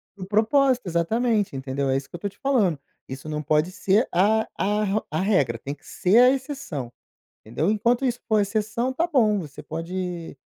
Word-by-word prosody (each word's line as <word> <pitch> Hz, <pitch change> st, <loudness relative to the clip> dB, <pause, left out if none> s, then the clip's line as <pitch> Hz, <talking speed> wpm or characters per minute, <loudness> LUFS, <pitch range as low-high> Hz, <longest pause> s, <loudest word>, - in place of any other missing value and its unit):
para 195 Hz, -, -8 dB
o -, -, -7 dB
propósito. 245 Hz, +5 st, +2 dB
Exatamente, 205 Hz, -, 0 dB
entendeu. 135 Hz, +1 st, -2 dB
É 135 Hz, -, +2 dB
isso 135 Hz, -, -6 dB
que -, -, -9 dB
eu -, -, -4 dB
estou 200 Hz, +4 st, -4 dB
te -, -, -24 dB
falando. 215 Hz, -, +1 dB, 0.3 s
Isso 135 Hz, +3 st, -8 dB
não 150 Hz, -1 st, -3 dB
pode 155 Hz, +3 st, +1 dB
ser 200 Hz, +5 st, +2 dB
a 215 Hz, +5 st, +3 dB
a 210 Hz, +2 st, +1 dB
r 210 Hz, +1 st, 0 dB
a 155 Hz, -, -1 dB
regra. 165 Hz, -, +1 dB
Tem 135 Hz, +5 st, -6 dB
que 145 Hz, -, -18 dB
ser 190 Hz, +5 st, +2 dB
a 250 Hz, +1 st, +8 dB
exceção, 260 Hz, -, -4 dB, 0.5 s
entendeu. 120 Hz, -, -1 dB
Enquanto 235 Hz, +5 st, +1 dB
isso 245 Hz, -2 st, -1 dB
for 215 Hz, -1 st, +3 dB
exceção, 215 Hz, +4 st, -1 dB
está 325 Hz, +6 st, 0 dB
bom. 225 Hz, -10 st, +3 dB
Você 150 Hz, -6 st, -8 dB
pode 170 Hz, +1 st, -5 dB
195 Hz, 200 wpm, -24 LUFS, 155-225 Hz, 0.5 s, a